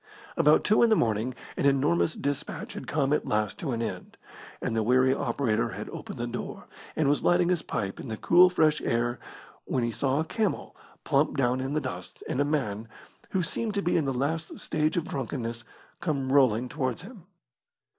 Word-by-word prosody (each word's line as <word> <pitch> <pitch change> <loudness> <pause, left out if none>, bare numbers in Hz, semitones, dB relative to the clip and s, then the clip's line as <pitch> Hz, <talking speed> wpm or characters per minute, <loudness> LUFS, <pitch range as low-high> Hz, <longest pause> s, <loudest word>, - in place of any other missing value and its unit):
About 155 -2 +5
two 215 - +4
in 235 - +6
the 220 - +5
morning 115 - 0 0.2
an 140 - +2
enormous 145 +4 +2
despatch 140 0 -4
had - - -7
come 145 -1 +1
at - - 0
last 105 -1 0
to 145 - -2
an 115 -1 -1
end, 90 -5 -6 0.4
and - - -2
the 110 - +2
weary 130 +3 +4
operator 115 -5 0
had - - -6
opened - - -7
the 120 - -2
door, 120 0 -6 0.3
and 155 - +2
was 145 +1 +2
lighting 175 0 +3
his 180 -3 +1
pipe 100 -3 -3
in - - -7
the 110 -2 -4
cool, 180 +8 +6
fresh 155 -4 +2
air, 120 0 0 0.5
when 125 - 0
he 120 - 0
saw 135 +4 0
a 160 - 0
camel 210 +2 -2 0.3
plump 145 +1 +1
down 130 -1 +2
in 135 +3 -2
the - - +3
dust, 90 -9 -7
and 130 - 0
a - - +5
man, 115 -8 -1 0.4
who 190 -2 0
seemed 215 +4 -2
to 200 - 0
be 175 - +1
in 160 - +2
the 135 - 0
last 145 +5 -2
stage 155 +2 -1
of 165 - -1
drunkenness, 115 -3 -4 0.4
come 140 -6 -1
rolling 125 -4 +4
towards 130 +1 -2
him. 200 -4 -12
135 Hz, 200 wpm, -28 LUFS, 120-160 Hz, 0.5 s, in